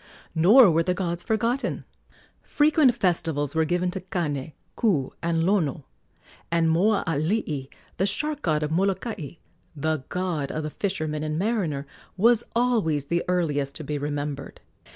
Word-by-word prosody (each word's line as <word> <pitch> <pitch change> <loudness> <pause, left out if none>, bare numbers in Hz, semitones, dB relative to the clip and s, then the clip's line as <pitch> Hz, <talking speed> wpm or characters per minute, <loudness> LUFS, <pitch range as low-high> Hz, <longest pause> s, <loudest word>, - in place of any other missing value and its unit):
Nor 200 +6 +7
were 165 +1 +3
the 180 +2 0
gods 175 -2 -2
forgotten. 230 +4 -1 0.6
Frequent 295 -4 +3
festivals 165 - 0
were 160 0 +2
given 180 +2 0
to 190 0 -5
Kane, 155 -6 -3 0.2
Ku, 160 - +1
and 165 -1 0
Lono; 165 -7 +1 0.7
and 165 -1 +2
Moaalii, 165 -5 0 0.3
the 195 - +2
shark 295 +8 -1
god 155 -2 +1
of 150 - -2
Molokai 190 - -1 0.4
the 155 -1 -1
god 175 -6 -2
of 155 - -3
the 155 - -4
fisherman 155 -6 -2
and 155 0 -2
mariner 180 -9 -1 0.3
was 230 +3 +4
always 220 - +1
the 170 +4 0
earliest 145 -6 0
to 155 - -6
be 145 +1 -3
remembered. 145 -1 -4
170 Hz, 140 wpm, -25 LUFS, 150-200 Hz, 0.7 s, Nor